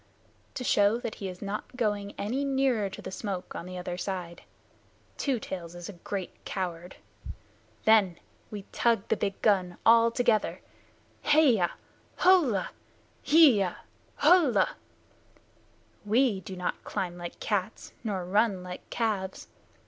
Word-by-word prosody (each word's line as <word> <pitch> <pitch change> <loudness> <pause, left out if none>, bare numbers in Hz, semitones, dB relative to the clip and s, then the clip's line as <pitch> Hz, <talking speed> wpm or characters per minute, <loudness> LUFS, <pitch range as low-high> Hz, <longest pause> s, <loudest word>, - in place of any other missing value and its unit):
"To 250 - -4
show 205 -1 +3
that 235 -2 -5
he 195 - -3
is 180 +1 -9
not 205 +5 -5
going 205 -4 -1
any 245 +8 -2
nearer 265 -7 +1
to - - -10
the - - -6
smoke 190 -2 -5
on 170 - -6
the 185 0 -7
other 180 0 -5
side. 180 -3 -5 0.7
Two 270 -5 -1
Tails 175 -4 -7
is 175 +1 -8
a - - -7
great 185 +2 -6
coward. 180 -2 -4 0.9
Then 205 -6 +5 0.3
we 205 -2 -7
tug 230 -4 +1
the - - +3
big 200 -2 -3
gun 185 -5 +2
all 230 0 +7
together 230 -2 +1 0.7
Heya 255 - +4 0.4
Hullah! 315 - +3 0.5
Heeyah! 255 - +5 0.4
Hullah! 300 - +4 1.3
We 220 0 +2
do 190 0 -8
not 180 0 -3
climb 175 -2 -3
like 175 0 -7
cats 205 -1 -3
nor 195 -5 -2
run 195 0 +1
like 180 0 -9
calves. 205 -5 -2
205 Hz, 135 wpm, -28 LUFS, 185-230 Hz, 1.3 s, all